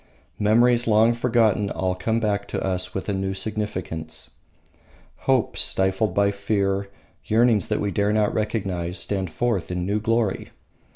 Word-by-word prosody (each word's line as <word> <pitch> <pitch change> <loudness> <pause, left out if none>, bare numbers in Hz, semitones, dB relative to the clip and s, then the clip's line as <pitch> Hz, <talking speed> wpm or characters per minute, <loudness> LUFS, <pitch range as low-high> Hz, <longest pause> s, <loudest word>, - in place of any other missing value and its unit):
Memories 120 +3 +3
long 110 +1 +5
forgotten 115 -4 +2
all 95 -1 -1
come 110 +5 -1
back 105 -3 -1
to - - -3
us 90 -1 -2
with 95 - -3
a 100 - 0
new 95 0 -2
significance. 95 -6 -4 1.0
Hopes 130 -4 +2
stifled 95 +1 +1
by 100 0 +3
fear, 100 -1 -1 0.4
yearnings 115 -1 +3
that 105 - 0
we 100 - -1
dare 100 0 +1
not 105 -1 +2
recognise, 95 -5 -2
stand 95 +1 -3
forth 115 +1 -1
in 90 0 -2
new 100 +3 0
glory. 115 -2 0
100 Hz, 150 wpm, -24 LUFS, 95-110 Hz, 1.0 s, long